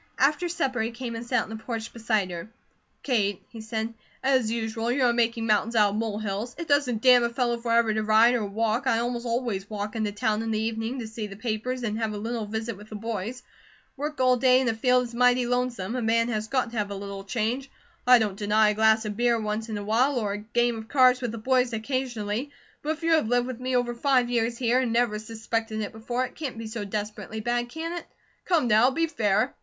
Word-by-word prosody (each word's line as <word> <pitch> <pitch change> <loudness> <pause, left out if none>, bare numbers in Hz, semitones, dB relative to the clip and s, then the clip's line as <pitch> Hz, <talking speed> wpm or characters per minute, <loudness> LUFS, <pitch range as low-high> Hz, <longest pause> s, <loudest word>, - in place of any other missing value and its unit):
After 300 +6 +2
supper 270 -8 -1
he 220 - -1
came 235 0 -6
and 230 - -5
sat 245 +1 +1
on - - -12
the - - -4
porch 225 -2 -5
beside 215 -5 0
her. 170 +4 -6 0.5
"Kate," 205 -7 0
he 225 - -9
said, 220 +1 -3 0.3
"as 260 -4 +3
usual 225 0 -2
you 260 +1 +1
are 240 -1 +4
'making 230 -1 +1
mountains 220 +1 +1
out 210 -2 +5
of - - -4
mole 220 -2 -2
hills.' 215 +3 -4
It 335 - -5
doesn't 255 -6 +1
damn 250 -2 +7
a 235 - +1
fellow 240 -1 0
forever 230 -1 +2
to 215 - 0
ride 220 +3 +5
or 240 -3 0
walk, 220 +5 -1
I 230 - +3
almost 240 +1 -2
always 230 -5 -2
walk, 210 0 -4
into 215 -2 -1
town 210 +1 0
in 225 - -3
the 215 -1 0
evening, 225 +3 -2
to 235 -3 -5
see 220 -1 -5
the 195 - -9
papers 240 +3 -3
and 215 -1 -2
have 220 -2 -1
a - - -4
little 225 +1 -3
visit 220 0 -4
with 210 +1 -13
the 215 - -7
boys. 225 +3 -4 0.5
Work 295 +1 -4
all 255 -1 +4
day 255 0 +5
in 260 - 0
a - - +1
field 250 +2 +3
is 240 -1 -8
mighty 250 +1 +3
lonesome; 245 -4 -1
a 250 - -1
man 230 +1 +2
has 215 -1 -2
got 255 -1 0
the 235 - -2
have 205 -1 -1
a 200 - -5
little 200 0 -6
change. 235 +6 -2 0.4
I 250 0 +9
don't 215 -4 0
deny 210 +1 +3
a - - +1
glass 220 +1 +3
of 210 -1 -3
beer 235 0 +2
once 215 +1 -3
in 215 - -3
awhile, 225 +7 +1
or 210 -4 -1
a - - -3
game 235 +2 0
of 220 - -9
cards 255 -2 +4
with 240 -3 -2
the 230 - -6
boys 250 +1 +1
occasionally; 235 0 -2 0.3
but 305 +2 -1
if 325 - -16
you 330 - +2
have 315 -8 +3
lived 245 +1 +2
with 255 -2 -6
me 255 0 -1
over 245 -1 +1
five 250 0 +2
years 235 0 0
here, 245 0 +2
and 250 -3 0
never 230 -2 +1
suspected 225 0 -3
it 205 - -4
before, 240 +3 -2
it - - -10
can't 280 -6 -5
be 225 - -6
so 220 0 -5
desperately 210 +2 -5
bad, 240 +2 -1
can 325 +5 -5
it? 345 - -6 0.4
Come 330 -8 +2
now, 220 +3 +5
be 330 +5 +1
fair!" 215 -11 +1
230 Hz, 245 wpm, -26 LUFS, 215-250 Hz, 0.5 s, I